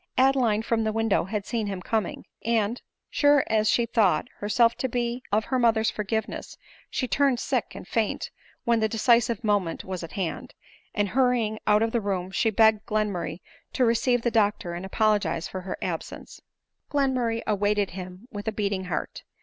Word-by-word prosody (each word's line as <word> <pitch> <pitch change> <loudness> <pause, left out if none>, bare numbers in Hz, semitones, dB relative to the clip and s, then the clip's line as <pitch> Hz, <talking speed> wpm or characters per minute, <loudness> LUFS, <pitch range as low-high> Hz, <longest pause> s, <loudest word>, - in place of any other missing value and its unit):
Adeline 255 -5 +3
from 225 0 0
the 220 - 0
window 225 -4 +1
had 205 +1 -3
^een 225 0 -2
him 195 -2 -3
coming; 215 0 -2 0.2
and 230 0 0 0.3
sure 290 -1 +4
as 215 -1 +2
she 235 - +3
thought 220 -5 +2
herself 230 +3 +3
to 255 +2 -3
be 240 +1 -2
of 215 +2 +2
her 260 - 0
mother's 225 -2 +3
forgiveness, 220 +1 -3 0.3
she 255 - -2
turned 275 -2 +2
sick - - -2
and - - -9
faint - - -1 0.3
when 235 -2 +2
the 220 0 +1
decisive 235 0 +2
moment 205 -6 0
was 185 -2 -4
at 165 - -8
hand; 180 -5 -4 0.4
and 205 -2 +1
hurrying 240 -3 +1
out 210 +1 +5
of 225 - 0
the 235 - 0
room 190 -2 -2
she 225 - +2
begged 220 0 +4
Glenmurray 200 -6 -2 0.3
to 255 - +2
receive 235 +1 +2
the 240 - +1
doctor 205 -5 +1
and 175 +2 -5
apologize 210 -4 +1
for 185 - -6
her 185 0 -5
absence. - - -6 0.5
Glenmurray 255 -5 0
awaited 205 -1 +1
him 185 +4 -9
with 205 +1 -7
a - - +2
beating 200 -3 -2
heart. 175 -4 -4
220 Hz, 175 wpm, -26 LUFS, 200-235 Hz, 0.5 s, out